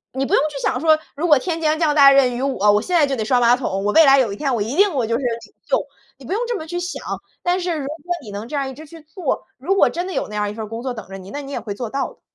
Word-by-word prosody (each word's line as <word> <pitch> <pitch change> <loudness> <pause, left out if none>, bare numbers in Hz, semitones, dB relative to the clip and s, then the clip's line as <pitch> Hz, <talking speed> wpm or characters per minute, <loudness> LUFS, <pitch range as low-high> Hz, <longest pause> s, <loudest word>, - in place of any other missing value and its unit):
你 265 +1 -1
不 - - 0
用 - - +4
去 285 - -6
想 - - 0
说， 315 -1 +4 0.2
如 320 +5 -1
果 300 -3 +6
天 330 +4 -3
将 310 0 +1
降 315 -3 +2
大 280 -2 +8
任 255 -3 +4
于 250 - -3
我， 210 -7 +2
我 210 - +2
现 360 - -3
在 320 -4 +5
就 275 -1 -2
得 220 - -2
刷 250 +2 +2
马 240 +1 +5
桶， 195 -6 -3
我 210 - +1
未 320 - +7
来 275 -1 +6
有 240 -6 +2
一 200 - -6
天 275 -1 -1
我 230 - -1
一 225 +7 -2
定 400 +1 +4
我 255 -5 0
就 230 - -1
是 275 - -6
领 230 -3 -4
袖， - - +1 0.3
你 - - -13
不 - - -5
用 420 - 0
这 475 - -1
么 315 - -8
去 350 +2 -4
想。 355 +1 -5 0.4
但 355 +1 +1
是 350 -2 -1
如 275 - -4
果 300 - -5 0.3
你 215 - -10
能 210 +4 -6
这 295 - -4
样 275 -1 -1
一 265 - -7
直 310 - -11
去 330 +2 -13
做， 310 0 -4
如 350 +10 0
果 - - +5
真 350 +2 -3
的 375 - -5
有 - - -2
那 210 - -9
样 210 0 -1
一 - - -7
份 220 0 -5
儿 - - -12
工 225 +2 -6
作 260 0 -2
等 220 -5 -9
着 195 - -8
你， 190 +1 -11
那 290 - -5
你 275 0 -8
也 245 - -3
会 210 -2 -5
做 240 +1 -5
到 275 +3 -2
的。 - - -28
275 Hz, 380 characters per minute, -20 LUFS, 230-315 Hz, 0.4 s, 大